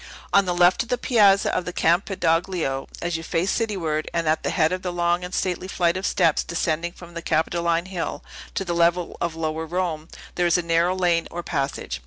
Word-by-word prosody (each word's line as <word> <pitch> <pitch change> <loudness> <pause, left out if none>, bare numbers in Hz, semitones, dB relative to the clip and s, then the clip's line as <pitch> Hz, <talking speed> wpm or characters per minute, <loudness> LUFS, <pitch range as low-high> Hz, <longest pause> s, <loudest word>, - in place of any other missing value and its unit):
On 200 0 +5
the 180 -1 -1
left 175 +1 +4
of 235 - -6
the 250 - +1
Piazza 205 -6 +4
of - - 0
the 180 - -3
Campidoglio, 170 -5 0 0.2
as 175 -1 -1
you - - -6
face 165 +3 -1
cityward, 170 -9 -1
and 165 -1 0
at 155 +1 +2
the - - -2
head 160 0 +2
of 185 0 -2
the 180 - -3
long 175 0 0
and 180 - -6
stately 185 -1 -2
flight 175 -2 +1
of 185 +1 -1
steps 160 - +2
descending 170 0 -1
from 175 -1 -13
the 170 - -5
Capitoline 170 +1 0
Hill 185 -3 -4 0.3
to 195 - -1
the 175 - -2
level 170 +1 +1
of 170 -1 -1
lower 160 0 -3
Rome, 165 -2 -2 0.3
there 175 -1 +1
is 170 - +4
a 175 - -1
narrow 170 +2 +2
lane 175 -3 +1
or 175 0 -6
passage. 135 - -3
170 Hz, 215 wpm, -23 LUFS, 165-180 Hz, 0.3 s, On